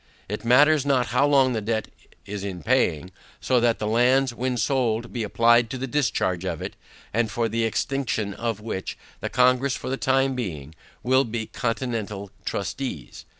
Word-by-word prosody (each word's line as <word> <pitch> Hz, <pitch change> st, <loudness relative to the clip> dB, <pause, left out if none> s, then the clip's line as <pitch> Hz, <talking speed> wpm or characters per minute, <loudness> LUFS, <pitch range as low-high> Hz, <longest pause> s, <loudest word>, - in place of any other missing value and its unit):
It 105 Hz, +3 st, -5 dB
matters 145 Hz, +5 st, +5 dB
not 135 Hz, -4 st, +1 dB
how 140 Hz, -, +4 dB
long 135 Hz, -3 st, +4 dB
the 110 Hz, -, -1 dB
debt 110 Hz, +1 st, -1 dB, 0.4 s
is 100 Hz, 0 st, -5 dB
in 90 Hz, -5 st, -5 dB
paying, 80 Hz, +5 st, +1 dB, 0.3 s
so 130 Hz, -1 st, +2 dB
that 120 Hz, -1 st, +2 dB
the 105 Hz, -, -3 dB
lands 125 Hz, +4 st, +3 dB
when 125 Hz, +1 st, -2 dB
sold 115 Hz, -1 st, 0 dB
be 120 Hz, -, -2 dB
applied 115 Hz, +2 st, +3 dB
to 130 Hz, -, -4 dB
the 130 Hz, -, -3 dB
discharge 110 Hz, -10 st, 0 dB
of 95 Hz, -, -3 dB
it, -, -, -6 dB, 0.4 s
and 115 Hz, 0 st, +1 dB
for 115 Hz, +3 st, 0 dB
the 115 Hz, 0 st, 0 dB
execution 115 Hz, -4 st, -1 dB
of 115 Hz, 0 st, -3 dB
which, 105 Hz, -3 st, -5 dB, 0.2 s
the -, -, -4 dB
Congress 125 Hz, +2 st, +3 dB
for -, -, -5 dB
the 135 Hz, -, -1 dB
time 135 Hz, 0 st, +2 dB
being, 80 Hz, -, -5 dB, 0.3 s
will 130 Hz, +2 st, +4 dB
be 115 Hz, -1 st, -3 dB
the -, -, -11 dB
continental 115 Hz, -5 st, -3 dB
trustees. 100 Hz, -, -4 dB
120 Hz, 180 wpm, -24 LUFS, 105-130 Hz, 0.4 s, matters